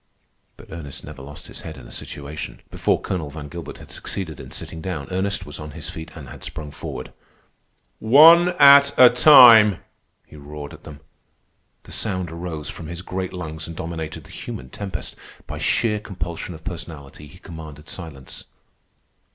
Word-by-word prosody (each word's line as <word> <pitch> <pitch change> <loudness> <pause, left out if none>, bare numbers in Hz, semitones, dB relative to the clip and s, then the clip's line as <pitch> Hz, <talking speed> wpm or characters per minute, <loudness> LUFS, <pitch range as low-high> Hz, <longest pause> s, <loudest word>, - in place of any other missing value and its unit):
But - - -15
Ernest 75 -4 -7
never 75 -3 -10
lost 70 +2 -11
his - - -10
head 80 -3 -8
in 65 - -12
a - - -14
situation. 75 +2 -7
Before - - +1
Colonel 85 -6 -3
Van 75 0 -8
Gilbert 85 +1 -8
had - - -13
succeeded 80 -6 -5
in - - -9
sitting 80 - -7
down, 80 -6 -4
Ernest 100 +2 -1
was 75 -1 -9
on 75 -1 -8
his 80 - -7
feet 80 0 -8
and 75 -5 -9
had - - -11
sprung 75 -1 -6
forward. - - -7 0.9
"One 165 +9 +8
at 140 0 +8
a 125 -1 +9
time!" 120 - +9 0.5
he - - -16
roared 75 0 -9
at - - -14
them. 75 -1 -11 0.8
The - - -14
sound 95 -5 -2
arose 85 -3 -6
from 80 - -7
his 85 +2 -6
great 95 -1 -4
lungs 80 -3 -6
and 85 - -8
dominated 80 -1 -5
the - - -16
human 65 0 -8
tempest. 100 -2 -5 0.3
By - - -7
sheer 105 -3 +1
compulsion 90 -3 -6
of 80 - -13
personality 80 -5 -8
he 90 - -15
commanded 80 -4 -10
silence. 75 -7 -8
80 Hz, 170 wpm, -22 LUFS, 75-95 Hz, 0.9 s, a